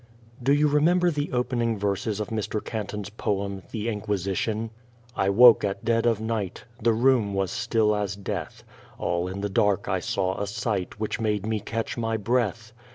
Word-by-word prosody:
Do 135 Hz, +3 st, +2 dB
you 145 Hz, +1 st, +4 dB
remember 170 Hz, +5 st, +3 dB
the 145 Hz, -1 st, -2 dB
opening 120 Hz, -2 st, 0 dB
verses 100 Hz, +1 st, -1 dB
of 105 Hz, -, -3 dB
Mr. 110 Hz, -1 st, -2 dB
Canton's 105 Hz, -2 st, -4 dB
poem, 100 Hz, -2 st, -2 dB
"The 110 Hz, -1 st, -4 dB
Inquisition"? 105 Hz, +1 st, -2 dB, 0.4 s
I 95 Hz, -, +1 dB
woke 115 Hz, +3 st, +7 dB
at 100 Hz, +2 st, -2 dB
dead 115 Hz, 0 st, +2 dB
of 115 Hz, -3 st, +2 dB
night; 110 Hz, -4 st, -3 dB, 0.2 s
The 115 Hz, +2 st, +4 dB
room 115 Hz, -3 st, +3 dB
was 95 Hz, -1 st, 0 dB
still 115 Hz, -3 st, +1 dB
as 100 Hz, -1 st, -2 dB
death; 100 Hz, -1 st, -5 dB, 0.3 s
All 85 Hz, +1 st, -1 dB
in 95 Hz, +2 st, -5 dB
the 105 Hz, -, 0 dB
dark 100 Hz, 0 st, +1 dB
I -, -, +1 dB
saw 95 Hz, 0 st, -1 dB
a 100 Hz, -, -1 dB
sight 105 Hz, -2 st, -3 dB
Which 110 Hz, +2 st, -2 dB
made 105 Hz, -3 st, 0 dB
me 110 Hz, -1 st, 0 dB
catch 115 Hz, +3 st, -4 dB
my 115 Hz, -1 st, 0 dB
breath. 110 Hz, 0 st, -1 dB
110 Hz, 175 wpm, -26 LUFS, 100-115 Hz, 0.4 s, woke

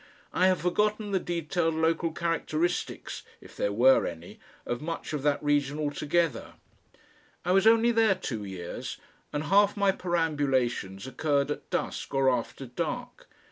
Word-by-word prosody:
I 185 Hz, -, +4 dB
have 185 Hz, -3 st, +2 dB
forgotten 210 Hz, +4 st, 0 dB
the 190 Hz, -, +2 dB
detailed 170 Hz, -1 st, -1 dB
local 160 Hz, +1 st, +1 dB
characteristics 170 Hz, +1 st, -2 dB, 0.2 s
if -, -, -15 dB
there 100 Hz, -, 0 dB
were 125 Hz, +6 st, +5 dB
any 85 Hz, +1 st, -8 dB, 0.3 s
of 120 Hz, +2 st, -3 dB
much 165 Hz, 0 st, -5 dB
of 150 Hz, -, -2 dB
that 145 Hz, +1 st, +1 dB
region 145 Hz, -1 st, +1 dB
altogether. 150 Hz, -2 st, -1 dB, 0.9 s
I 180 Hz, -, +1 dB
was 195 Hz, +3 st, +4 dB
only 230 Hz, +1 st, +6 dB
there 225 Hz, -4 st, +4 dB
two 115 Hz, -, -4 dB
years, 95 Hz, -3 st, -6 dB, 0.3 s
and 145 Hz, +1 st, -2 dB
half 200 Hz, +5 st, +4 dB
my 200 Hz, -1 st, +4 dB
perambulations 140 Hz, -, 0 dB
occurred 140 Hz, +1 st, 0 dB
at -, -, -6 dB
dusk -, -, -3 dB
or 135 Hz, -1 st, +4 dB
after 125 Hz, +2 st, -3 dB
dark. 125 Hz, 0 st, -5 dB
155 Hz, 145 wpm, -28 LUFS, 135-180 Hz, 0.9 s, only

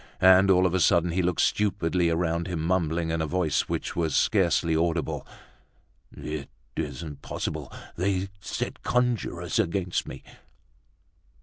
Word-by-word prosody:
And 95 Hz, +1 st, +6 dB
all 90 Hz, -1 st, +5 dB
of 90 Hz, -, +1 dB
a 95 Hz, -, +2 dB
sudden, 85 Hz, 0 st, +3 dB
he 90 Hz, +3 st, +1 dB
looked 90 Hz, -1 st, +1 dB
stupidly 90 Hz, -4 st, +1 dB
around 85 Hz, 0 st, 0 dB
him, 85 Hz, -3 st, -3 dB
mumbling, 85 Hz, -2 st, 0 dB
in 80 Hz, -1 st, -1 dB
a 80 Hz, -, -1 dB
voice 85 Hz, -2 st, 0 dB
which -, -, -3 dB
was 80 Hz, -4 st, 0 dB
scarcely 85 Hz, -4 st, +2 dB
audible: 85 Hz, -1 st, -1 dB, 0.8 s
"It 75 Hz, -3 st, -6 dB, 0.3 s
isn't 75 Hz, -1 st, -5 dB
possible, -, -, -4 dB, 0.3 s
they 95 Hz, +1 st, 0 dB
set 100 Hz, -, -4 dB
conjurers 115 Hz, -8 st, 0 dB
against 90 Hz, -2 st, -1 dB
me!" -, -, -8 dB
85 Hz, 135 wpm, -26 LUFS, 80-95 Hz, 0.8 s, And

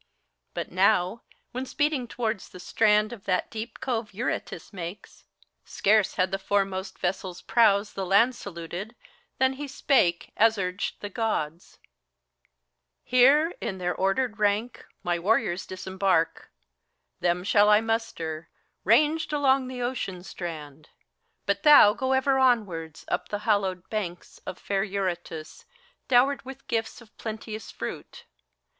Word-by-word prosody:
But -, -, -4 dB
now, 185 Hz, +3 st, +2 dB, 0.3 s
when 255 Hz, +2 st, -4 dB
speeding 290 Hz, -4 st, 0 dB
towards 225 Hz, -4 st, -3 dB
the 180 Hz, -, -12 dB
strand 210 Hz, +3 st, +2 dB
of 210 Hz, -5 st, -11 dB
that 185 Hz, -2 st, 0 dB
deep 225 Hz, +1 st, -6 dB
cove 225 Hz, -5 st, -3 dB
Eurotas 235 Hz, -1 st, -4 dB
makes, 180 Hz, +1 st, -8 dB, 0.4 s
scarce 210 Hz, 0 st, +2 dB
had 185 Hz, -1 st, +1 dB
the 195 Hz, -, -1 dB
foremost 195 Hz, -1 st, -1 dB
vessek' 180 Hz, 0 st, -3 dB
prows 210 Hz, -3 st, +3 dB
The 195 Hz, -, -3 dB
land 200 Hz, +7 st, +4 dB
saluted, 185 Hz, +3 st, -7 dB, 0.4 s
than 260 Hz, 0 st, +3 dB
he 285 Hz, +2 st, -6 dB
spake, 260 Hz, -10 st, +1 dB
as 225 Hz, 0 st, +4 dB
urged 185 Hz, 0 st, -3 dB
the 205 Hz, -, -5 dB
Gk)ds: 180 Hz, -7 st, -3 dB, 1.3 s
"Here, 280 Hz, +7 st, +5 dB
in 190 Hz, -, -3 dB
their 180 Hz, -1 st, -1 dB
ordered 215 Hz, +4 st, 0 dB
rank, 210 Hz, +3 st, 0 dB, 0.2 s
my 175 Hz, -1 st, 0 dB
warriors 190 Hz, -1 st, +1 dB
disembark; 185 Hz, -2 st, -1 dB, 0.7 s
Them 175 Hz, 0 st, 0 dB
shall 205 Hz, +1 st, +4 dB
I 210 Hz, 0 st, +7 dB
muster, 220 Hz, -9 st, -3 dB, 0.3 s
ranged 310 Hz, +1 st, +3 dB
along 275 Hz, -3 st, +2 dB
the 250 Hz, -1 st, -5 dB
ocean 195 Hz, -8 st, -3 dB
strand. 155 Hz, -5 st, -8 dB, 0.6 s
But 200 Hz, 0 st, 0 dB
thou 290 Hz, -9 st, +8 dB
go 260 Hz, +3 st, -1 dB
ever 265 Hz, 0 st, +2 dB
onwards, 200 Hz, -, 0 dB
up -, -, -2 dB
the 205 Hz, -, -2 dB
hallowed 190 Hz, -4 st, 0 dB
banks 180 Hz, -5 st, -5 dB
Of 185 Hz, -, -5 dB
fair 195 Hz, 0 st, -1 dB
Eurotas, 180 Hz, -5 st, -4 dB, 0.4 s
dowered 265 Hz, +3 st, +4 dB
with 265 Hz, +1 st, -11 dB
gifts 225 Hz, +1 st, -2 dB
of 220 Hz, -2 st, -19 dB
plenteous 220 Hz, -1 st, -6 dB
fruit. -, -, -7 dB
205 Hz, 135 wpm, -26 LUFS, 185-240 Hz, 1.3 s, thou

